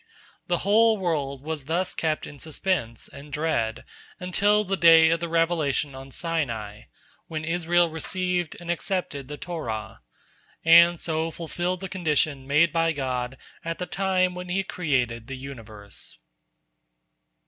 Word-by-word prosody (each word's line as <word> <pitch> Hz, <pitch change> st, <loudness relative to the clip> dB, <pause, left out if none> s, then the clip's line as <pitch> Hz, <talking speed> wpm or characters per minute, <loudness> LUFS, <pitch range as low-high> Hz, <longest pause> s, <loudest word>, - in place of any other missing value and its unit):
The 175 Hz, -, +1 dB
whole 220 Hz, +2 st, +5 dB
world 145 Hz, -7 st, -2 dB
was 155 Hz, -3 st, -4 dB
thus 175 Hz, +4 st, -1 dB
kept 155 Hz, -2 st, -1 dB
in 145 Hz, -, -11 dB
suspense 155 Hz, -, -2 dB
and 140 Hz, +1 st, -12 dB
dread 140 Hz, -7 st, -1 dB, 0.4 s
until 205 Hz, +3 st, +2 dB
the 195 Hz, -1 st, -1 dB
day 165 Hz, -2 st, +7 dB
of 165 Hz, -, +2 dB
the 170 Hz, 0 st, -3 dB
revelation 160 Hz, -4 st, +1 dB
on 135 Hz, +1 st, -9 dB
Sinai, 125 Hz, -, -3 dB, 0.4 s
when 155 Hz, -1 st, -4 dB
Israel 175 Hz, +1 st, +2 dB
received 175 Hz, +1 st, -2 dB
and 175 Hz, 0 st, -3 dB
accepted 175 Hz, -7 st, -2 dB
the 145 Hz, +1 st, -7 dB
Torah, 115 Hz, -, -5 dB, 0.6 s
and 170 Hz, +1 st, +7 dB
so 160 Hz, 0 st, -1 dB
fulfilled 175 Hz, +2 st, -3 dB
the 190 Hz, -, -4 dB
condition 155 Hz, -6 st, 0 dB
made 150 Hz, +4 st, +4 dB
by 165 Hz, -1 st, +2 dB
God 130 Hz, -2 st, -3 dB, 0.3 s
at 165 Hz, 0 st, -3 dB
the 180 Hz, -, -3 dB
time 185 Hz, -1 st, +1 dB
when 180 Hz, 0 st, -7 dB
He 195 Hz, +2 st, 0 dB
created 125 Hz, -11 st, -1 dB
the 135 Hz, -, -6 dB
universe. 110 Hz, -6 st, -6 dB
160 Hz, 140 wpm, -25 LUFS, 140-175 Hz, 0.6 s, day